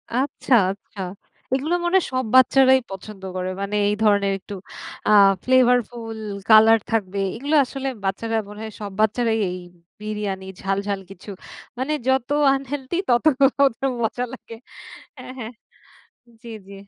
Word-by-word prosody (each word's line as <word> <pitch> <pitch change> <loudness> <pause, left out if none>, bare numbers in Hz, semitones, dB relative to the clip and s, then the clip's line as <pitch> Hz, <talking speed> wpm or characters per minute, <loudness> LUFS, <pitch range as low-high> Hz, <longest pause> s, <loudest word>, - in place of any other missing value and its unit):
আচ্ছা! 265 0 +1 0.2
আচ্ছা! 200 0 -10 0.5
এগুলো 300 +6 0
মনে 350 +2 +1
হয় 375 - +1
সব 255 -1 0
বাচ্চারাই 265 0 +6
পছন্দ 195 +1 -9
করে। 185 0 -3
মানে 200 +1 -3
এই 205 - +1
ধরনের 200 -2 +3
একটু 205 - -10 0.5
আ - - +3 0.3
flavourful 245 -3 +1 0.3
colour 220 +1 +7
থাকবে, 200 -3 -1 0.2
এগুলো 290 +5 -1
আসলে 270 +1 -5 0.2
বাচ্চারা 225 +4 -2
মনে 210 - -10
হয় 220 - -7
সব 205 -1 -5
বাচ্চারাই 220 +1 +1
এই 180 - -5 0.4
বিরিয়ানি, 210 -3 -4 0.2
ঝাল, 195 0 -1
ঝাল 200 -1 -1
কিছু, 195 +1 -12 0.5
মানে 265 +4 -2
যত 265 -1 +1 0.3
unhealthy 270 +2 -5
তত 240 +5 +2 0.4
ওগুলো 270 0 +1
মজা 235 +2 -1
লাগে। 230 -3 -10 0.6
অ্যা - - -10
হ্যাঁ, 225 -1 -6 0.9
জি, 235 - -9 0.2
জি। 200 - -11
225 Hz, 140 wpm, -22 LUFS, 205-260 Hz, 0.9 s, colour